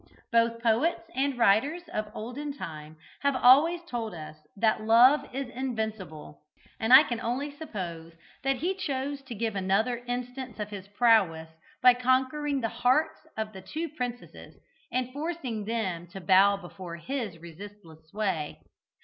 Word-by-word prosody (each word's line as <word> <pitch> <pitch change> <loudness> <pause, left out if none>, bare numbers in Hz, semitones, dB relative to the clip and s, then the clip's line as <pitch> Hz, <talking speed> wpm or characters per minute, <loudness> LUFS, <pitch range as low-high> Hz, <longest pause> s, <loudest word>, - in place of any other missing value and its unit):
But 230 0 +2
poets 230 +3 +2
and 270 0 0
writers 245 - +3
of 215 0 -2
olden 270 +6 -5
time 155 - -8 0.2
have 280 -1 +2
always 300 +8 +5
told 235 - -4
us 155 -1 -8 0.2
that 220 +1 +2
Love 240 +6 +7
is 270 +1 -3
invincible, 220 - -5 0.4
and 225 +2 0
I 260 +3 +11
can 240 -5 -4
only 260 +5 -2
suppose 175 - -6 0.3
that 270 0 +2
he 350 +9 -1
chose 280 -6 -3
to 265 -3 -8
give 220 0 -2
another 195 +6 +1
instance 250 -1 -5
of 210 0 -4
his 195 -2 -7
prowess 200 -7 +3 0.3
by 250 0 +9
conquering 260 +3 +1
the 225 - 0
hearts 305 +8 +1
of 220 0 -3
the 190 - -9
two 315 - -4
princesses, 250 -4 -7 0.4
and 255 0 -2
forcing 285 -8 -4
them 190 -7 -2
to 185 +3 -9
bow 190 +3 +5
before 180 -2 -9
his 220 -1 -4
resistless 170 -1 -12
sway. 190 -7 -2
230 Hz, 150 wpm, -28 LUFS, 195-265 Hz, 0.4 s, I